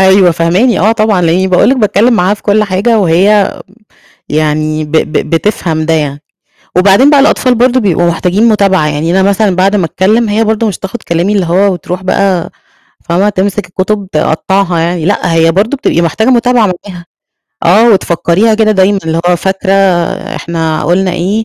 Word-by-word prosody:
أيوه، 190 Hz, -1 st, +4 dB
فاهماني. 175 Hz, +9 st, +1 dB
آه، 215 Hz, +4 st, +2 dB
طبعًا، 215 Hz, -5 st, 0 dB
لإنّي 175 Hz, +3 st, +1 dB
باقول 185 Hz, +4 st, +2 dB
لِك 270 Hz, -, +1 dB
باتكلّم 215 Hz, +1 st, +1 dB
معاها 185 Hz, +1 st, +1 dB
في -, -, -18 dB
كل 210 Hz, +1 st, +1 dB
حاجة 205 Hz, +4 st, 0 dB
وهي 195 Hz, +3 st, +2 dB, 0.8 s
يعني 155 Hz, 0 st, -1 dB
ب 150 Hz, -, -13 dB
ب 160 Hz, -1 st, 0 dB, 0.2 s
بتفهم 165 Hz, -2 st, -1 dB
ده 165 Hz, -, 0 dB
يعني. 145 Hz, -2 st, -2 dB, 0.6 s
وبعدين 200 Hz, +9 st, +4 dB
بقى 285 Hz, -2 st, +4 dB
الأطفال 260 Hz, -3 st, +2 dB
برضه 250 Hz, +2 st, +1 dB
بيبقوا 175 Hz, -4 st, 0 dB
محتاجين 185 Hz, +6 st, 0 dB
مُتابعة، 195 Hz, -7 st, +1 dB
يعني 150 Hz, +2 st, -2 dB
أنا -, -, +2 dB
مثلًا 200 Hz, -2 st, 0 dB
بعد 195 Hz, +2 st, +1 dB
ما 185 Hz, -, 0 dB
أتكلّم 215 Hz, +7 st, 0 dB
هي 215 Hz, +2 st, 0 dB
برضه 220 Hz, +1 st, -1 dB
مش 190 Hz, -, -4 dB
هتاخُد 200 Hz, +4 st, -7 dB
كلامي 170 Hz, +4 st, -1 dB
اللي 195 Hz, -4 st, 0 dB
هو 190 Hz, +4 st, +1 dB
وتروح 180 Hz, +1 st, -6 dB
بقى 185 Hz, -2 st, -1 dB, 0.6 s
فاهمة، 185 Hz, +4 st, +1 dB
تمسِك 200 Hz, 0 st, -2 dB
الكُتب 195 Hz, +2 st, -3 dB
تقطعها 175 Hz, +4 st, -1 dB
يعني، 170 Hz, 0 st, -2 dB
لأ، 185 Hz, -2 st, -1 dB
هي 165 Hz, 0 st, +2 dB
برضه 215 Hz, +9 st, 0 dB
بتبقي 170 Hz, -, -1 dB
محتاجة 210 Hz, +8 st, -1 dB
مُتابعة 245 Hz, -2 st, +2 dB, 0.2 s
معاها 180 Hz, -4 st, -10 dB, 0.6 s
آه، 220 Hz, +7 st, +4 dB
وتفكّريها 185 Hz, +3 st, +1 dB
كده 215 Hz, 0 st, +1 dB
دايمًا 195 Hz, 0 st, +2 dB
اللي 160 Hz, +1 st, -1 dB
هو 180 Hz, -, +2 dB
فاكرة 190 Hz, +1 st, -2 dB, 0.6 s
إحنا 160 Hz, -2 st, -3 dB
قُلنا 180 Hz, +3 st, 0 dB
إيه، 195 Hz, +6 st, -2 dB
190 Hz, 175 wpm, -10 LUFS, 170-210 Hz, 0.8 s, أيوه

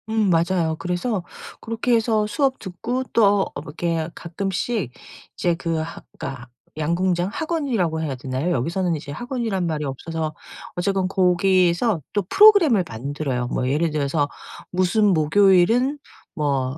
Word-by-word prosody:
음. 220 Hz, -2 st, +2 dB
맞아요. 170 Hz, -1 st, +2 dB
그래서 180 Hz, +2 st, -2 dB, 0.4 s
그렇게 230 Hz, +2 st, -1 dB
해서 220 Hz, -2 st, +2 dB
수업 265 Hz, +4 st, 0 dB
듣고 230 Hz, +7 st, -3 dB
또 205 Hz, -3 st, +4 dB
어 -, -, -4 dB
이렇게 160 Hz, +2 st, -2 dB
가끔씩 190 Hz, -, -3 dB, 0.5 s
이제 175 Hz, -1 st, +1 dB
그 165 Hz, -1 st, -2 dB
하 165 Hz, +1 st, -7 dB, 0.2 s
그러니까 130 Hz, -2 st, -6 dB, 0.3 s
양궁장 175 Hz, +3 st, 0 dB
학원이라고 240 Hz, -, -1 dB
해야 145 Hz, -4 st, -2 dB
되나요? 130 Hz, +6 st, -2 dB
여기서는 170 Hz, +6 st, 0 dB
이제 145 Hz, -1 st, -7 dB
학원이란 225 Hz, -, -2 dB
말이 155 Hz, -2 st, -2 dB
없어서 155 Hz, +3 st, -4 dB, 0.4 s
어쨌건 190 Hz, +1 st, 0 dB
거기서 185 Hz, +1 st, +2 dB
또 205 Hz, -, +2 dB
프로그램을 350 Hz, -, +6 dB
만들어요. 125 Hz, +1 st, -3 dB
뭐 125 Hz, -, -1 dB
예를 155 Hz, +4 st, +1 dB
들어서 145 Hz, 0 st, 0 dB, 0.4 s
무슨 185 Hz, +4 st, +2 dB
목요일은 195 Hz, -, +4 dB, 0.3 s
뭐 140 Hz, -4 st, -1 dB
175 Hz, 320 characters per minute, -22 LUFS, 155-210 Hz, 0.5 s, 프로그램을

